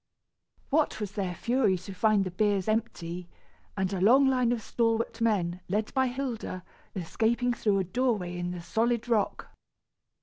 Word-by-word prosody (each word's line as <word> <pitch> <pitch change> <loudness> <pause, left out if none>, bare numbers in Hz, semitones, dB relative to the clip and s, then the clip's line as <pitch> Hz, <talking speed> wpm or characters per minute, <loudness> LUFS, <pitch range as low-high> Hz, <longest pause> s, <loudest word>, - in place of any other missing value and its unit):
What 305 -4 +2
was 210 -3 -3
their 190 -4 -3
fury 230 -5 +2
to 185 +2 -9
find 210 +1 +3
the 185 - -4
biers 200 0 +1
empty, 180 -6 -2 0.5
and 190 0 0
a 185 - -2
long 255 +8 +6
line 255 -3 +3
of 235 -3 -1
stalwart 230 0 0
men, 185 -6 +1
led 210 +3 -1
by 265 -1 +2
Hilda, 245 -8 -4 0.3
escaping 230 +7 0
through 210 -4 +1
a 190 - +1
doorway 200 -3 -1
in 175 0 -3
the 180 -1 -5
solid 230 +6 0
rock! 225 -4 0
215 Hz, 160 wpm, -28 LUFS, 185-235 Hz, 0.5 s, long